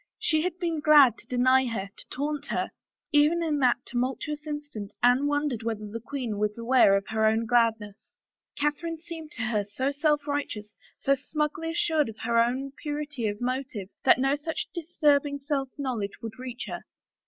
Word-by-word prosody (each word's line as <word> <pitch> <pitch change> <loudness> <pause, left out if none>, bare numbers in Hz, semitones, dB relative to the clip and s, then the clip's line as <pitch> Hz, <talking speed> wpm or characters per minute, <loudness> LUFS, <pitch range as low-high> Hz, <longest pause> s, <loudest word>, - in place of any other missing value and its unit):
She 315 -1 +1
had 355 +1 -2
been 335 -3 -1
glad 295 -6 +6
to - - -16
deny 255 +1 +3
her, 200 -4 -4
to - - -10
taunt 290 +2 -3
her. - - -2 0.4
Even 305 +3 +4
in 305 -3 0
that 250 -2 +2
tumultuous 270 +5 -3
instant 290 -9 -6
Anne 250 +4 +5
wondered 290 -5 0
whether 220 -2 -3
the 220 +3 -5
queen 235 -4 -4
was 210 +1 0
aware 235 -4 +5
of 195 - -4
her 220 0 0
own 220 +1 +2
gladness. 225 -3 +1 0.5
Catherine 295 +3 -1
seemed 325 -2 -8
to 225 - -4
her 215 -2 0
so 260 +7 -2
self 295 0 +1
righteous, 225 -8 -3 0.3
so 275 - +3
smugly 300 +3 -2
assured 320 -4 +1
of 220 - -9
her 230 0 +2
own 255 +4 +1
purity 295 -5 -3
of 205 +1 -4
motive, 250 -6 -3
that - - +6
no 270 +2 +2
such 310 +2 -4
disturbing 295 -4 +1
self 275 -1 -2
knowledge 240 -8 -2
could 225 +1 -8
reach 250 -1 -6
her. - - -5
270 Hz, 175 wpm, -27 LUFS, 230-295 Hz, 0.5 s, glad